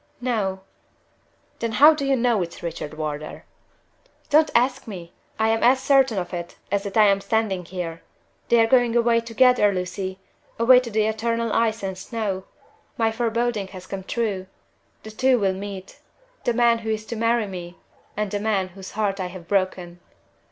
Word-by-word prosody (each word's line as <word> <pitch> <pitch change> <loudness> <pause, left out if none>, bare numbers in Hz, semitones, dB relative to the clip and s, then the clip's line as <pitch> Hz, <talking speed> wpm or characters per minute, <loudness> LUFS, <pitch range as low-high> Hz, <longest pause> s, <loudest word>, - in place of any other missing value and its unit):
"No." 210 -6 -1 1.0
"Then 230 -1 -2
how 300 +6 +8
do 295 -2 -3
you 275 - +3
know 235 -4 +2
it's 170 0 -6
Richard 160 -3 -5
Wardour?" 155 -1 -5 0.9
"Don't 305 +1 +5
ask 255 +2 +2
me! 175 -5 -8 0.2
I 220 0 +2
am 225 0 +1
as 255 +2 +5
certain 265 -4 +3
of 175 -1 -3
it, 175 -1 -6
as 200 0 +1
that 200 +2 -3
I 215 - +7
am 200 -1 +3
standing 200 -5 -1
here! 170 -2 -6 0.5
They 235 - +5
are - - +5
going 240 0 +3
away 235 -1 +3
together, 230 -2 +3
Lucy 185 0 -4 0.4
away 250 +2 +7
to 250 -2 -6
the 215 -1 +1
eternal 230 +1 -1
ice 225 -2 +1
and 190 -1 -3
snow. 195 -1 -4 0.5
My 225 -2 +2
foreboding 230 -2 -1
has 185 - -10
come 195 0 -6
true! 200 -3 -2 0.6
The 220 - -9
two 255 +3 +3
will 195 -4 +1
meet 195 0 -8 0.5
the 240 - +2
man 235 -1 +4
who 220 -1 -5
is 215 0 -2
to 235 - -5
marry 230 0 +1
me 180 -3 -8 0.4
and 210 -2 -2
the 205 - -1
man 200 -3 0
whose 190 +1 -11
heart 205 -2 -1
I 185 - -2
have 180 -2 -10
broken!" 185 -3 -1
215 Hz, 180 wpm, -23 LUFS, 190-235 Hz, 1.0 s, how